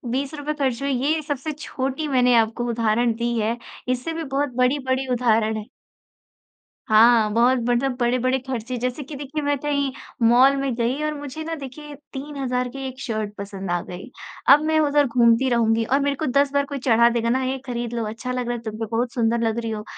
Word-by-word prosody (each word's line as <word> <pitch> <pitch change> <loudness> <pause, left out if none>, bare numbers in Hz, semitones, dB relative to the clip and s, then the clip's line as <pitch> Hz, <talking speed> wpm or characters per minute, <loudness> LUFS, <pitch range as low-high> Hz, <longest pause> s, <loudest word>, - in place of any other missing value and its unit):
20 275 +2 -2
रुपये 300 0 -3
खर्च 270 -4 -1
हुए 275 0 0
ये 290 +5 +1
सबसे 290 0 -3
छोटी 275 +1 -3
मैंने 250 -3 +3
आपको 230 +1 +2
उदाहरण 230 0 +1
दी 235 +1 -1
है। 225 +2 0 0.3
इससे 255 +6 -1
भी 325 0 -4
बहुत 280 -1 -2
बड़ी-बड़ी 260 +1 +1
उदाहरण 225 -3 +2
है। 215 - -6 1.2
हाँ, 220 0 +6
बहुत 245 +3 +4
मतलब 250 +2 +1
बड़े-बड़े 250 +2 +1
खर्चे 255 -1 -4
जैसे 250 +4 -3
कि 285 +3 -9
देखिए 285 +2 -4
मैं 285 0 +1
कहीं 280 -1 0 0.4
मॉल 255 +4 +6
में 275 -2 -1
गई 240 +4 -1
और 305 0 -1
मुझे 290 +1 -7
ना 325 +1 -4
देखिए 290 +1 -9 0.2
3000 265 -3 -3
की 270 +2 -7
एक 260 0 -9
शर्ट 215 -4 -3
पसंद 195 -2 -6
आ 175 - +1
गई। 185 +8 -9 0.4
अब 295 - +5
मैं 315 0 +2
उधर 290 -1 +3
घूमती 240 +1 +3
रहूँगी 225 -1 +2
और 275 +4 +2
मेरे 280 0 0
को 310 - -3
10 280 +1 +2
बार 280 0 +2
कोई 280 0 -5
चढ़ा 235 -2 +4
देगा 230 -1 0
ना 260 +2 +1
ये 260 +1 -1
खरीद 240 -2 -4
लो, 230 -2 -2
अच्छा 225 +4 -5
लग 250 -1 -2
रहा 240 - -1
है - - -9
तुम 215 -1 -5
पे, 225 - -1
बहुत 230 +3 -1
सुंदर 235 -1 +1
लग 225 0 -1
रही 230 -1 -3
हो। 210 -1 -4
255 Hz, 210 wpm, -23 LUFS, 235-280 Hz, 1.2 s, हाँ